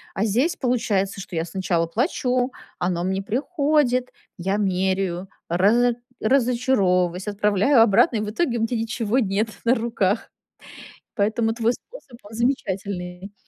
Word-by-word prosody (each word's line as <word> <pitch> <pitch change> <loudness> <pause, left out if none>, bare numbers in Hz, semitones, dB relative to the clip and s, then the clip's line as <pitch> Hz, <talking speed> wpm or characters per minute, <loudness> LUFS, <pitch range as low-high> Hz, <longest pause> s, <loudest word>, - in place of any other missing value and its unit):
А 200 - +1
здесь, 255 - +1
получается, 205 -6 0
что 180 - -8
я 160 - 0
сначала 175 -2 -1
плачу, 250 +5 0 0.3
оно 175 -1 -1
мне 190 +1 -1
приходит, 270 - +1 0.3
я 195 +3 -1
меряю, 190 -2 -1 0.2
разо 230 +8 +3 0.3
разочаровываюсь, 215 -8 +2
отправляю 210 +5 +3
обратно, 230 +2 +4
и - - 0
в 210 - -3
итоге 240 -2 0
у - - -2
меня 230 +1 0
ничего 225 0 -1
нет 210 -1 0 0.2
на 235 - +5
руках. 225 -3 -1 0.9
Поэтому 225 +2 +1
твой 235 +1 +1
способ, 285 - -13
он 205 - -13
замечательный. 195 -6 -3
215 Hz, 135 wpm, -23 LUFS, 190-245 Hz, 0.9 s, на